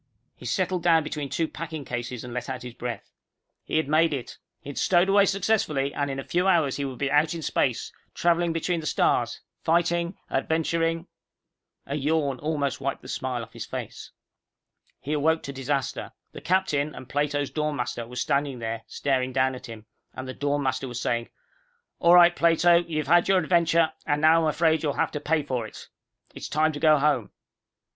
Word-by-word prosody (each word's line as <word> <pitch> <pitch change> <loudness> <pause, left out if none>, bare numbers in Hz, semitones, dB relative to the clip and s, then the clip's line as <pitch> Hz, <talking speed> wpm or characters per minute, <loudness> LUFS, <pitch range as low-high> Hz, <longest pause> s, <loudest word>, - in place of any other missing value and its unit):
He 125 - -9
settled 185 +6 0
down 165 -2 +4
between 150 -2 -4
two 165 +3 0
packing 160 -4 -6
cases 120 -1 -4
and 120 -1 -8
let 125 +2 -4
out 130 -2 -5
his 125 -1 -8
breath. 120 0 -6 0.5
He - - -1
had 160 - +1
made 155 +1 +3
it. 125 -3 -7 0.2
He 145 - -8
had - - -5
stowed 180 +1 +3
away 200 0 +5
successfully, 190 -9 0
and 145 -1 -1
in 135 - -3
a 135 - -4
few 180 +6 0
hours 165 -8 +3
he 140 - -2
would 130 -2 -5
be 140 +1 -1
out 150 +3 +3
in 165 - -6
space, - - 0 0.2
traveling 170 0 +2
between 165 +1 -1
the 155 - -5
stars, - - +1 0.2
fighting, 170 +2 +1
adventuring 165 +3 0 0.8
A 140 - -5
yawn 145 -2 0
almost 145 -3 -2
wiped 140 0 -3
the - - -10
smile 125 -2 -3
off - - -13
his - - -7
face. - - -7 0.9
He 145 - -4
awoke 160 +2 +1
to 140 - -6
disaster. 135 0 -3 0.2
The - - -10
captain 155 -5 0
and 130 - -10
Plato's 145 0 -1
dorm 150 -1 -1
master 120 -2 -3
were 125 - -11
standing 140 +1 0
there, 115 -1 -4
staring 130 -2 -1
down 130 0 +1
at 125 0 -9
him, 110 -2 -10 0.3
and 130 - -6
the 130 - -5
dorm 145 +1 -1
master 130 0 -1
was 120 -1 -5
saying, 120 -1 -1 0.7
"All 170 0 +6
right, 175 0 +7
Plato, 170 +1 +4
you've 155 -3 -2
had 175 +4 +4
your 195 - +4
adventure, 170 -2 +3
and 145 0 +1
now 160 +1 +6
I'm 160 - +2
afraid 160 +1 +2
you'll 145 -3 0
have - - 0
to 150 - -3
pay 155 +1 0
for 125 -5 -3
it. - - -12 0.4
It's - - -7
time 155 +2 +2
to 145 - -5
go 155 0 +5
home." 135 -7 +1
150 Hz, 195 wpm, -26 LUFS, 130-165 Hz, 0.9 s, right